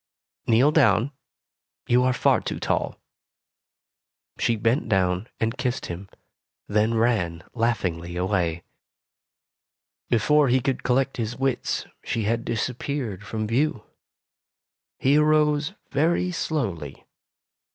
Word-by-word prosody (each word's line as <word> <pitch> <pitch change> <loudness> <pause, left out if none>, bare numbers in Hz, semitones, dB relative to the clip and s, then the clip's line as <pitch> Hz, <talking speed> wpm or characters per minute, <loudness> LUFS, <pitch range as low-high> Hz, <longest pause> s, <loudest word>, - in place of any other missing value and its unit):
Kneel 125 +6 +5
down. 125 - +3 0.7
You 125 +1 +3
are 130 0 +3
far 125 - +2
too - - -4
tall." - - -1 1.4
She 115 - +2
bent 115 +4 0
down 95 +1 +1
and 115 +1 0
kissed 125 0 -1
him, 95 +3 -9 0.6
then 110 +2 +2
ran 105 -8 +1
laughingly 90 -8 -1
away. 90 -3 0 1.5
Before 145 +6 +4
he 130 +1 +3
could 130 +1 -1
collect 135 +2 +1
his 115 0 -3
wits, 135 -2 -1 0.2
she 115 - -2
had 115 +3 -1
disappeared 120 -2 -3
from 110 +1 -3
view. 125 +1 0 1.1
He 140 +3 +3
arose 150 +1 +3 0.2
very 170 +5 +1
slowly. 100 - -3
115 Hz, 110 wpm, -25 LUFS, 100-135 Hz, 1.5 s, Kneel